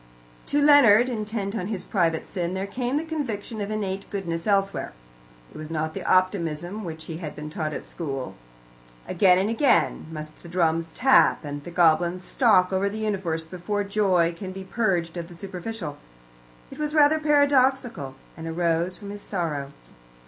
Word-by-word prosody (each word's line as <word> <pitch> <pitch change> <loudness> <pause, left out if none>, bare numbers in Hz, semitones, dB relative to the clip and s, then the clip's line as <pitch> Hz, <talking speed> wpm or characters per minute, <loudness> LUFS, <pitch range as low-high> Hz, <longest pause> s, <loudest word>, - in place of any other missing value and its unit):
To 290 - +1
Leonard, 260 -6 +6
intent 215 -3 -3
on 185 -4 -2
his 205 -4 -3
private 165 -5 0
sin, 180 -1 -3
there 190 +1 -2
came 245 +6 -2
the 305 - -1
conviction 240 -9 -4
of 200 - -3
innate 200 -2 -3
goodness 170 -3 -4
elsewhere. 195 -1 0 0.6
It - - -10
was 155 0 -7
not 155 -1 -2
the - - -5
optimism 185 +1 0
which 160 -3 -6
he 160 - -6
had 160 -3 -6
been 150 0 -7
taught 155 -1 -3
at - - -6
school. 135 -6 -5 0.7
Again 185 -2 +4
and 190 +2 +1
again 235 - +2
must 155 -1 -8
the 170 - -11
drums 165 -2 +1
tap, 260 - +4
and 145 0 -5
the - - -8
goblins 175 +1 +3
stalk 195 -5 +3
over 195 +1 +1
the 210 - -6
universe 190 -7 -2
before 185 +5 -3
joy 190 -4 +2
can 185 +1 -6
be 190 0 -7
purged 190 -5 -1
of 170 -1 -5
the 175 - -12
superficial. 185 -2 -6 0.7
It - - -10
was 300 0 -2
rather 305 +1 +5
paradoxical, 265 - +2 0.2
and 160 +1 -7
arose 170 +2 0
from 200 -1 -8
his 205 0 -8
sorrow. 150 -9 -3
190 Hz, 170 wpm, -25 LUFS, 165-215 Hz, 0.7 s, Leonard